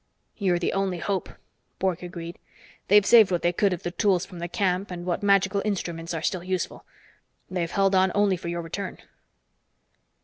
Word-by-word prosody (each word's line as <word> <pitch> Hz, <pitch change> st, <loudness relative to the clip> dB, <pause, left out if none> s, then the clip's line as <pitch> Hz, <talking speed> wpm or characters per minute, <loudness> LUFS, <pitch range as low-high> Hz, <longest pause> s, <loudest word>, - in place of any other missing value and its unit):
"You're 185 Hz, -4 st, +1 dB
the 175 Hz, -, -1 dB
only 195 Hz, -2 st, 0 dB
hope," 190 Hz, +2 st, -2 dB, 0.5 s
Bork 185 Hz, -3 st, -1 dB
agreed. 170 Hz, -1 st, -7 dB, 0.5 s
"They've 205 Hz, 0 st, +6 dB
saved 225 Hz, -3 st, +7 dB
what 175 Hz, -2 st, -1 dB
they 175 Hz, 0 st, +2 dB
could 200 Hz, +3 st, +2 dB
of 180 Hz, -, -4 dB
the 175 Hz, -, -3 dB
tools 185 Hz, 0 st, +1 dB
from 180 Hz, -, -11 dB
the 170 Hz, -, -3 dB
camp 185 Hz, +1 st, -1 dB
and 175 Hz, -1 st, -6 dB
what 175 Hz, -1 st, -1 dB
magical 200 Hz, -1 st, +3 dB
instruments 170 Hz, -5 st, -3 dB
are 160 Hz, -, -4 dB
still 180 Hz, -2 st, -1 dB
useful. 185 Hz, -1 st, -3 dB, 0.7 s
They've 175 Hz, -2 st, -1 dB
held 195 Hz, +1 st, +2 dB
on 190 Hz, 0 st, +4 dB
only 205 Hz, -2 st, +3 dB
for 170 Hz, -, -8 dB
your 170 Hz, 0 st, -3 dB
return." 185 Hz, +4 st, -5 dB
185 Hz, 180 wpm, -25 LUFS, 175-195 Hz, 0.7 s, saved